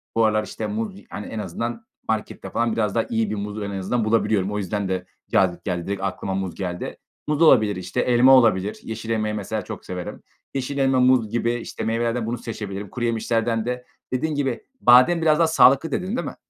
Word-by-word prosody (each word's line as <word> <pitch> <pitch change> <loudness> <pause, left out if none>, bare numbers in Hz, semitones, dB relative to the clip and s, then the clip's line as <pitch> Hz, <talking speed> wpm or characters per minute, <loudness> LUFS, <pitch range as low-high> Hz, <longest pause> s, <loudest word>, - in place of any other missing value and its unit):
bu 115 0 +4
aralar, 110 0 +2
işte, - - -5
muz, 215 -1 -3 0.2
hani, 105 - -6
en 110 - -5
azından 115 - -4 0.2
markette 110 -1 -3
falan 115 -1 0
biraz 105 -2 0
daha 115 - +3
iyi 110 -2 0
bir 105 - -2
muz 105 +1 -5
en 100 - -4
azından 110 +4 -1
bulabiliyorum. 110 -3 +1
O 105 - -2
yüzden 100 0 -2
de 95 -1 -2 0.3
cazip 90 -2 +2
geldi, 90 -2 -2
direkt 100 -1 -3
aklıma 95 0 -2
muz 95 -2 -3
geldi. 90 -2 -4 0.3
Muz 150 +1 0
olabilir, 110 -10 +5
işte. 90 0 -2
Elma 125 +2 +5
olabilir. 105 -5 +3
Yeşil 110 0 -6
elmayı, 110 -1 0
mesela, 100 -3 -3
çok - - -8
severim. 90 -1 -6 0.3
Yeşil 135 +1 -3
elma, 135 -1 +3
muz 125 -4 +4
gibi, 120 +1 0
işte, 120 - -5
meyvelerden 115 +1 0
bunu 120 +2 -2
seçebilirim. 105 -4 -6
Kuruyemişlerden 115 -1 -1
de 125 0 -3 0.3
dediğin 150 +4 -1
gibi 135 -4 -1 0.2
badem 125 +8 +6
biraz 155 -1 +3
daha 165 - +5
sağlıklı 140 0 +5
dedin, 185 - -2
değil - - -2
mi? - - -6
115 Hz, 200 wpm, -23 LUFS, 100-125 Hz, 0.3 s, badem